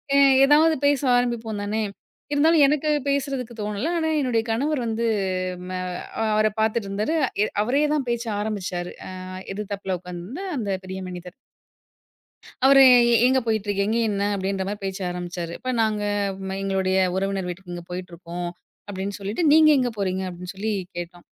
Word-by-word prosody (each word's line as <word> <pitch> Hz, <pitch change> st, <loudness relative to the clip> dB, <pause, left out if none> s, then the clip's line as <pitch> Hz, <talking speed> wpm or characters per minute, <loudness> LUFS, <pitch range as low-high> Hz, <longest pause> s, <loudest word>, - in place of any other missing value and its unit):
எ -, -, +6 dB, 0.3 s
எதாவது 315 Hz, +3 st, +5 dB
பேச 285 Hz, -1 st, +2 dB, 0.2 s
ஆரம்பிப்போம் 230 Hz, -4 st, -1 dB
தானே. 215 Hz, +1 st, -1 dB, 0.5 s
இருந்தாலும் 310 Hz, +1 st, +5 dB
எனக்கு 300 Hz, +1 st, +1 dB, 0.2 s
பேசுறதுக்கு 270 Hz, -4 st, -1 dB
தோணல. 210 Hz, +8 st, -2 dB
ஆனா 320 Hz, -1 st, 0 dB
என்னுடைய 240 Hz, -5 st, +1 dB
கணவர் 285 Hz, +5 st, 0 dB
வந்து 225 Hz, +1 st, -1 dB, 0.6 s
ம -, -, -6 dB, 0.6 s
அவர 215 Hz, 0 st, +3 dB
பாத்துட்டு 220 Hz, -1 st, +1 dB
இருந்தாரு. 210 Hz, +11 st, -1 dB, 0.3 s
எ -, -, +3 dB, 0.2 s
அவரே 275 Hz, +6 st, +2 dB
தான் 275 Hz, -5 st, -1 dB
பேச்ச 235 Hz, 0 st, -1 dB
ஆரம்பிச்சாரு. 185 Hz, -4 st, -3 dB
அ -, -, -7 dB, 0.4 s
எதுதாப்பில 200 Hz, -2 st, -3 dB
உட்காந்துருந்த 180 Hz, -, -7 dB
அந்த 205 Hz, -4 st, -2 dB
பெரிய 190 Hz, 0 st, -6 dB
மனிதர். 180 Hz, 0 st, -8 dB, 1.3 s
அவரு, 275 Hz, 0 st, +8 dB, 0.4 s
எங்க 260 Hz, 0 st, +3 dB
போயிட்டுருக்கீங்க 210 Hz, 0 st, 0 dB
என்ன? 200 Hz, -1 st, -1 dB
அப்படின்ற 190 Hz, 0 st, -2 dB
மாரி 205 Hz, +1 st, -4 dB
பேச்ச 195 Hz, 0 st, -3 dB
ஆரம்பிச்சாரு. 175 Hz, -1 st, -5 dB
இப்ப 255 Hz, 0 st, -3 dB
நாங்க, 215 Hz, -1 st, 0 dB, 0.6 s
எங்களுடைய 190 Hz, -1 st, +1 dB, 0.2 s
உறவினர் 195 Hz, -1 st, -1 dB
வீட்டுக்கு 175 Hz, 0 st, -7 dB
இங்க 175 Hz, -, -7 dB
போயிட்டுருக்கோம். 175 Hz, -1 st, -6 dB, 0.4 s
அப்படின்னு 200 Hz, 0 st, -4 dB
சொல்லிட்டு, 205 Hz, -, -2 dB
நீங்க 310 Hz, 0 st, +7 dB
எங்க 250 Hz, -, +1 dB
போறீங்க? 190 Hz, -1 st, -1 dB
அப்படின்னு 180 Hz, +1 st, -8 dB
சொல்லி 215 Hz, +3 st, -2 dB, 0.3 s
கேட்டோம். 175 Hz, 0 st, -7 dB
210 Hz, 145 wpm, -24 LUFS, 190-250 Hz, 1.3 s, அவரு